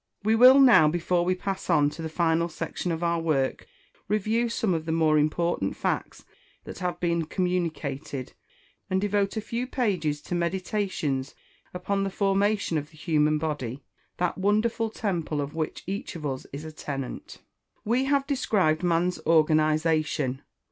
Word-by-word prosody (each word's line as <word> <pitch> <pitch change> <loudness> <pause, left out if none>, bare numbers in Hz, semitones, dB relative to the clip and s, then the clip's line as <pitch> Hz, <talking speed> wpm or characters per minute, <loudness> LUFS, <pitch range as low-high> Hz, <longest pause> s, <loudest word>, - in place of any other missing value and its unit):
We 215 +2 +3
will 255 +4 +8
now, 245 - +7
before 175 +2 +1
we 185 +1 +1
pass 190 +1 -4
on 145 -4 +4
to 165 - -8
the 160 - -4
final 170 +1 +1
section 165 +2 -4
of 165 +1 -3
our 170 0 +1
work, 150 -5 -1 0.4
review 220 +3 +1
some 220 -4 0
of 160 -1 -2
the - - 0
more 160 -2 +3
important 155 - 0
facts - - -3 0.4
that - - -9
have 180 -1 -3
been 170 -2 0
communicated, 155 -7 -3 0.6
and 185 - +1
devote 205 +1 0
a - - 0
few 235 +4 -3
pages 180 - -1
to - - -6
meditations 175 -6 -2 0.4
upon 195 +2 -2
the 195 - -1
formation 200 -3 +1
of 145 +1 -9
the 155 - -19
human 155 -1 +2
body 145 -4 -4 0.3
that 180 +1 -1
wonderful 215 +3 +1
temple 175 -9 -2
of 145 0 -3
which 160 -1 -4
each 195 0 -5
of 155 -3 -6
us 135 -2 -4
is 145 +3 -7
a 155 - -7
tenant. 140 -4 -6 0.5
We 245 +5 +1
have 275 0 +2
described 205 - +1
man's 175 0 +1
organisation. 155 -3 +2
170 Hz, 160 wpm, -26 LUFS, 155-200 Hz, 0.6 s, will